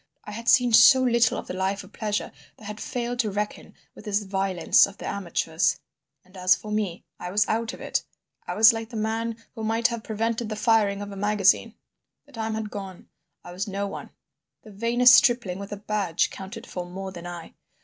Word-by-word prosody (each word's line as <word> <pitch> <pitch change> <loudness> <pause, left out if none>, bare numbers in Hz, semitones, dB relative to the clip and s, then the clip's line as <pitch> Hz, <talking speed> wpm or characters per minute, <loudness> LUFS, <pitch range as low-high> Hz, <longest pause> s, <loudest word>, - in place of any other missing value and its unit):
I - - -9
had 230 +2 -3
seen 245 -2 +4
so 260 +3 +8
little 235 -2 +3
of - - -6
the - - -6
life 190 +2 -2
of - - -17
pleasure 210 -2 -3 0.3
that - - -17
I - - -11
had 210 +1 -7
failed 245 0 -4
to 225 -4 +1
reckon 205 +1 -5 0.2
with - - -14
this 210 0 0
violence 190 -3 +3
of 200 0 -13
the - - -9
amateurs. 170 -3 -1 0.5
And 185 +1 -22
as 185 0 +4
for 215 - -9
me, 205 -5 -2 0.2
I 180 - -5
was 205 +3 +2
out 225 +2 -1
of - - -11
it. - - -1 0.4
I - - -3
was 220 +2 +7
like 225 0 -5
the 235 - -10
man 225 +1 -2 0.2
who 225 - -7
might 225 +2 +1
have 235 -2 -5
prevented 225 +1 -2
the 215 - -3
firing 210 -3 +2
of 205 - -8
a - - -8
magazine. 205 +2 +2 0.5
The - - -21
time 220 -1 -3
had 220 -1 -4
gone. 195 -3 -8 0.3
I - - -10
was 190 +4 -4
no 200 0 -3
one; 200 - -7 0.5
the 215 - -13
vainest 235 +4 +5
stripling 230 -6 +4
with 200 0 -8
a 205 - -4
badge 200 -4 -1
counted 220 +5 -9
for 180 - -5
more 190 +1 -6
than 175 -1 -9
I. 175 -2 -8
210 Hz, 215 wpm, -25 LUFS, 195-225 Hz, 0.5 s, so